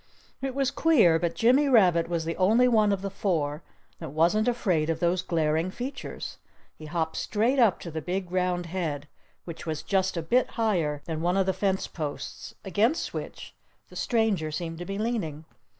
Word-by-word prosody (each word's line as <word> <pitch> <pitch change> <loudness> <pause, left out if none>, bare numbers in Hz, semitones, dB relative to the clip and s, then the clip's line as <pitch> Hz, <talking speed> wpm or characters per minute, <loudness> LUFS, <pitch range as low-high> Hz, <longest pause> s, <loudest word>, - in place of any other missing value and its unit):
It 265 -1 -3
was 275 -1 +1
queer—but 180 - +3
Jimmy 260 +5 +4
Rabbit 180 -9 +4
was 170 -2 -1
the 165 0 -2
only 220 +7 +4
one 215 -4 +4
of 195 -1 -1
the 195 - -3
four 155 -7 -1 0.4
that 160 - -6
wasn't 170 - +2
afraid 185 -10 +1
of 165 -1 -1
those 175 +2 +1
glaring 160 0 0
features. 255 +8 -6 0.3
He 155 - -11
hopped 160 0 -2
straight 235 +6 +1
up 225 -7 +4
to 170 - -7
the 160 0 -4
big 180 +1 -3
round 180 -1 0
head, 160 -5 -3 0.4
which 170 -1 -8
was 155 -1 -3
just 190 -1 0
a 165 - -2
bit 245 +10 +2
higher 165 -10 0
than 160 -1 -4
one 175 +3 +1
of 195 - +3
the 190 - +1
fence 190 0 0
posts, 150 -4 -6
against 220 - +1
which - - -7 0.4
the - - -14
stranger 220 -9 +1
seemed 165 +1 -5
to 175 - -5
be 195 +1 -4
leaning. 200 -9 -2
180 Hz, 180 wpm, -27 LUFS, 160-215 Hz, 0.4 s, Jimmy